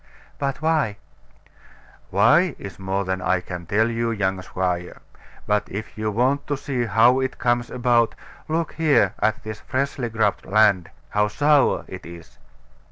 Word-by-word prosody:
But 140 Hz, +1 st, -3 dB
why? 155 Hz, -10 st, +1 dB, 1.1 s
Why, 140 Hz, -, +4 dB
is 100 Hz, -, -9 dB
more 95 Hz, +1 st, -2 dB
than 95 Hz, 0 st, -2 dB
I 90 Hz, +1 st, +1 dB
can 90 Hz, -1 st, -8 dB
tell, 110 Hz, +4 st, +2 dB
young 110 Hz, -5 st, -1 dB
squire. 90 Hz, -1 st, -3 dB, 0.5 s
But 105 Hz, 0 st, 0 dB
if 105 Hz, +3 st, -6 dB
you 110 Hz, 0 st, -2 dB
want 130 Hz, +6 st, 0 dB
to 145 Hz, -2 st, -1 dB
see 130 Hz, -3 st, -2 dB
how 115 Hz, +4 st, +4 dB
it 130 Hz, 0 st, -2 dB
comes 120 Hz, 0 st, 0 dB
about, 120 Hz, -2 st, +2 dB, 0.3 s
look 165 Hz, +1 st, -1 dB
here 155 Hz, -2 st, +3 dB
at 110 Hz, 0 st, 0 dB
this 110 Hz, 0 st, -6 dB
freshly 130 Hz, -2 st, -2 dB
grubbed 110 Hz, -2 st, 0 dB
land 100 Hz, -4 st, +3 dB, 0.2 s
how 105 Hz, 0 st, +2 dB
sour 145 Hz, +5 st, +2 dB
it -, -, -9 dB
is. 85 Hz, -1 st, -13 dB
110 Hz, 150 wpm, -23 LUFS, 100-130 Hz, 1.1 s, Why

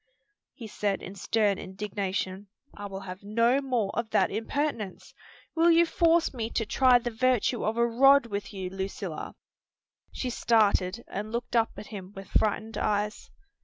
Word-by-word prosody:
he 240 Hz, -, -9 dB
said 205 Hz, -2 st, -2 dB
in 190 Hz, -, -7 dB
stern 205 Hz, 0 st, +1 dB
indignation. 195 Hz, 0 st, -4 dB, 0.3 s
"I 205 Hz, 0 st, -6 dB
will 195 Hz, 0 st, -7 dB
have 185 Hz, -1 st, -8 dB
no 230 Hz, +6 st, +2 dB
more 245 Hz, -7 st, -1 dB
of 235 Hz, -1 st, -2 dB
that -, -, +2 dB
impertinence! 225 Hz, -1 st, -3 dB, 0.4 s
Will 335 Hz, +1 st, +4 dB
you 340 Hz, 0 st, +6 dB
force 335 Hz, -1 st, +2 dB
me 230 Hz, -3 st, -3 dB
to 225 Hz, -, -1 dB
try 255 Hz, +3 st, +5 dB
the 240 Hz, 0 st, -3 dB
virtue 250 Hz, 0 st, +1 dB
of 220 Hz, +2 st, -1 dB
a 235 Hz, -, +4 dB
rod 270 Hz, +3 st, +5 dB
with 200 Hz, -3 st, -5 dB
you, 190 Hz, -3 st, -5 dB
Lucilla?" 190 Hz, -3 st, -5 dB, 0.8 s
She 255 Hz, -, -3 dB
started 215 Hz, -3 st, +2 dB
and 210 Hz, +2 st, -5 dB
looked 240 Hz, +1 st, -4 dB
up 230 Hz, -1 st, +2 dB
at -, -, -7 dB
him 190 Hz, -1 st, -8 dB
with 195 Hz, -1 st, -9 dB
frightened 220 Hz, +1 st, 0 dB
eyes. 210 Hz, 0 st, -1 dB
215 Hz, 165 wpm, -28 LUFS, 195-240 Hz, 0.8 s, you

